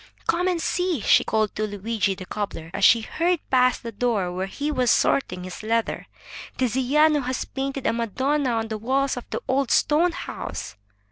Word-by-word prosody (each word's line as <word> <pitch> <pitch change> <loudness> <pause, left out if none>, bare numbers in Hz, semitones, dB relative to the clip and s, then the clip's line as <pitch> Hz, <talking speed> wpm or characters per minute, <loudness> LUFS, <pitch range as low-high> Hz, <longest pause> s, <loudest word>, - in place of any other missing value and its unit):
"Come 355 +2 +1
and 360 -2 +1
see!" 355 -2 0
she - - +5
called 215 -1 0
to 215 0 -1
Luigi, 205 -1 -1
the 185 - -9
cobbler, 180 -6 -5
as 200 - -3
she 230 +2 +7
hurried 340 +8 -1
past 255 -1 +3
the 230 - -5
door 210 -5 0
where 185 +2 -3
he 290 +9 -3
was 250 -4 +1
sorting 180 -9 +2
his 185 0 -7
leather. 225 +1 -1 0.5
"Tiziano 265 +5 +3
has 255 0 -3
painted 275 0 -4
a - - +2
madonna 260 +5 0
on 225 -1 -1
the 220 -1 -4
walls 265 +4 0
of 245 - -8
the - - -3
old 265 -1 +1
stone 330 +4 +3
house." - - -6
245 Hz, 185 wpm, -24 LUFS, 215-275 Hz, 0.5 s, she